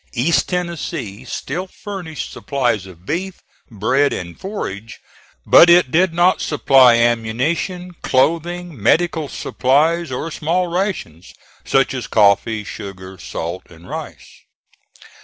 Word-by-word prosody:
East 135 +7 +1
Tennessee 165 - -4
still 175 +9 -4
furnished 185 -7 -7
supplies 120 -8 -1
of 90 -1 -15
beef, 180 - -3 0.3
bread 130 +6 +1
and 85 -1 -6
forage, 115 - -6 0.5
but 170 - +7
it 170 -6 +5
did 180 +2 +3
not 175 +2 +3
supply 135 -5 +5
ammunition, 120 - 0
clothing, 170 +1 0
medical 160 - +2
supplies, 155 +5 +1
or 150 +6 -4
small 170 +5 0
rations, 175 - -4 0.3
such 135 -1 +2
as 130 -2 -4
coffee, 105 +1 +2
sugar, 95 -2 -9
salt 85 +2 -6
and 85 +1 -16
rice. - - -9
140 Hz, 115 wpm, -19 LUFS, 110-175 Hz, 0.5 s, but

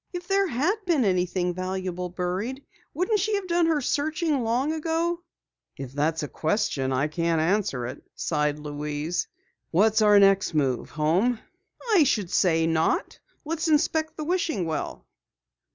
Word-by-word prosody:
If 355 0 -6
there 390 0 +2
had 320 - 0
been 305 -9 +3
anything 180 -1 0
valuable 185 0 -3
buried, 190 +10 -3 0.3
wouldn't 370 +7 0
she 425 +3 0
have 400 -2 -3
done 345 -1 +2
her 315 -3 +2
searching 305 +1 0
long 245 +7 0
ago?" 330 +2 -1 0.6
"If 135 -2 -7
that's 155 +3 0
a - - -2
question, 155 -6 -1
I 130 +3 +1
can't 165 +1 0
answer 160 - 0
it," 125 +3 -7
sighed 150 -2 0
Louise. 150 +2 -3 0.4
"What's 215 +5 +3
our 210 -1 +6
next 195 -4 +4
move? 135 -5 0
Home?" 175 +11 +1 0.6
"I 360 -6 +7
should 210 -10 0
say 165 -3 +3
not! 160 0 0 0.3
Let's 325 +2 -2
inspect 315 +1 +1
the 310 - -3
wishing 325 - -1
well." 160 -1 -4
195 Hz, 150 wpm, -26 LUFS, -, 0.6 s, I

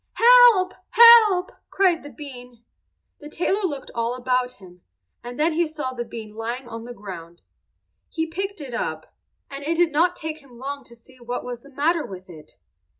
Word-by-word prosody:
"Help! 470 -6 +6 0.2
help!" 445 -6 +7 0.2
cried 370 -4 +2
the 290 - -10
bean. 250 -6 -12 0.6
The 295 - -11
tailor 365 +6 -1
looked 285 -5 -7
all 235 +1 -2
about 250 0 -1
him, 180 -5 -17 0.4
and 245 +3 -8
then 320 +2 +2
he 335 +1 +1
saw 295 -4 -5
the 240 -1 -4
bean 220 -2 -9
lying 235 +3 -5
on 230 -1 -8
the 245 - -8
ground. 170 -5 -10 0.7
He 320 -1 -2
picked 385 +3 -5
it 265 -4 -8
up, 235 - -5 0.4
and 275 0 -7
it 325 +3 -1
did 340 -1 +2
not 345 +4 +2
take 315 0 -6
him 265 -5 -18
long 280 +3 -6
to 235 - -13
see 255 +2 -19
what 245 +1 -5
was 245 -1 -6
the 280 - -17
matter 305 +4 0
with 185 -4 -10
it. 155 -2 -14
275 Hz, 185 wpm, -23 LUFS, 235-335 Hz, 0.7 s, help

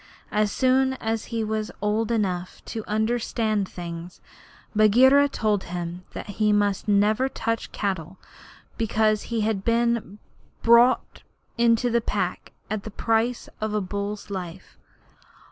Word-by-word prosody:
As 210 -1 +1
soon 265 +2 +3
as 225 -3 -3
he 230 -1 -2
was 215 0 -2
old 210 +2 0
enough 185 -5 -2
to 220 - -5
understand 220 -2 0
things, 170 0 -7 0.6
Bagheera 260 +7 +6
told 210 -6 0
him 175 0 -5
that - - -6 0.2
he 210 0 +4
must 205 -1 +1
never 210 +5 +3
touch 230 -3 -3
cattle 190 -3 -3 0.6
because 215 -1 +2
he 230 -2 -2
had 210 -2 0
been 235 -3 0 0.5
bought 235 +2 +4 0.3
into 235 +1 +3
the 235 0 +2
Pack - - -3 0.2
at 215 -1 -3
the 215 - -7
price 225 +3 0
of 215 0 -2
a - - +2
bull's 200 +2 -4
life. 185 -2 -7
215 Hz, 130 wpm, -25 LUFS, 200-230 Hz, 0.6 s, Bagheera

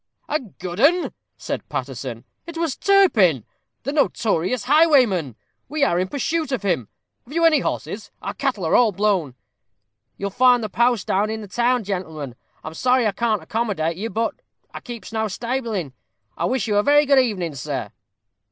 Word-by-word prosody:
"A 305 - 0
good 185 - -8
'un!" 335 +8 +3 0.2
said - - -5
Paterson; 130 -3 -5 0.2
"it 335 -1 -7
was 330 -4 -1
Turpin, 220 - +4 0.4
the 280 - -3
notorious 225 - +1
highwayman. 255 - +4 0.3
We 300 +1 0
are 175 -10 +2
in 185 - 0
pursuit 310 - -2
of 260 -5 -2
him. 170 - 0 0.4
Have 260 - -13
you 335 0 +3
any 320 -2 +5
horses? - - -4
our - - -5
cattle 255 - -2
are 160 - 0
all 240 -3 +5
blown." 190 -9 0 0.8
"You'll 200 0 -3
find 245 +2 +4
the 215 - -3
post 235 +1 +1
house 205 +3 +1
in 220 0 -4
the 210 - -8
town, 240 +4 +1
gentlemen. 160 -9 -4 0.3
I'm 155 - -7
sorry 250 +6 +2
I 210 - +2
can't 220 +1 -1
accommodate 205 -9 -1
you. 215 +6 -4
But 225 0 -1 0.4
I - - -6
keeps 235 -2 -9
no 220 0 0
stabling. 225 - -3 0.4
I - - -1
wish 255 -1 0
you 210 -2 +1
a - - +5
very 290 +5 +4
good 275 -1 +5
evening, 195 - 0
sir." 130 -3 -4
220 Hz, 175 wpm, -22 LUFS, 180-260 Hz, 0.8 s, any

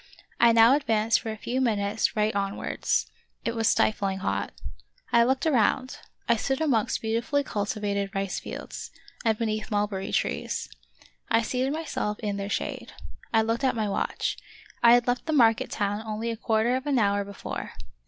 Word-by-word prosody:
I 235 0 +7
now 230 +2 +7
advanced 225 -5 +2
for 225 - -6
a 220 - -6
few 250 +4 -2
minutes 215 -3 +1
right 215 -1 +1
on 200 0 -1
wards. - - -1 0.4
It 230 - -1
was 225 -1 +1
stifling 195 -3 +2
hot. 195 - -2 0.6
I 235 - +7
looked 260 +4 +1
around 255 -2 +1
— - - -42
I 235 - +4
stood 270 +4 -1
amongst 255 -11 +1
beautifully 235 +6 0
cultivated 205 -3 -2
rice 195 -1 -1
flelds, - - -7 0.3
and 220 -2 +2
beneath 215 -1 -2
mulberry 205 -2 -1
trees. - - -1 0.6
I 225 - +3
seated 255 +3 -1
myself 295 -9 -2
in 205 -3 -3
their 200 0 -4
shade. - - -3 0.4
I 225 -1 +4
looked 230 +2 -1
at 260 - +2
my 215 -2 0
watch; 200 - -1 0.4
I 235 0 +8
had 245 -1 +2
left 245 +4 -1
the 315 - 0
market 230 -6 +4
town 205 0 -1
only 220 +1 -3
a - - -3
quarter 225 +2 +1
of 260 +3 -3
an 280 -2 +2
hour 200 -2 +2
be 200 0 -10
fore. - - -6
225 Hz, 180 wpm, -27 LUFS, 205-240 Hz, 0.6 s, I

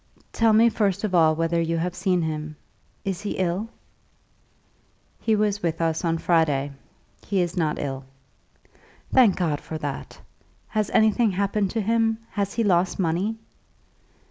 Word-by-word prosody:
"Tell 225 -1 +3
me 220 +2 +6
first 205 -3 0
of 210 -3 -1
all 160 -3 +5
whether 165 +1 0
you 165 0 -1
have 175 +2 -2
seen 180 -1 0
him. 155 -1 -4 0.5
Is 190 -2 -2
he 210 - -3
ill?" 185 +4 -1 1.5
"He 220 - +1
was 205 -1 0
with 165 -2 -1
us 165 0 0
on 165 -1 +1
Friday. 150 -5 +1 0.6
He 200 - 0
is 175 -1 -1
not 160 -4 0
ill." 135 -2 -4 1.1
"Thank 235 -7 +6
God 160 -5 -1
for 160 - -6
that. 145 -3 -6 0.5
Has 215 -2 -1
anything 220 +1 +3
happened 200 +1 0
to 225 - -1
him? 225 +1 +1
Has 200 -1 -2
he 230 - +1
lost 180 -3 +2
money?" 190 +5 0
180 Hz, 150 wpm, -24 LUFS, 165-210 Hz, 1.5 s, me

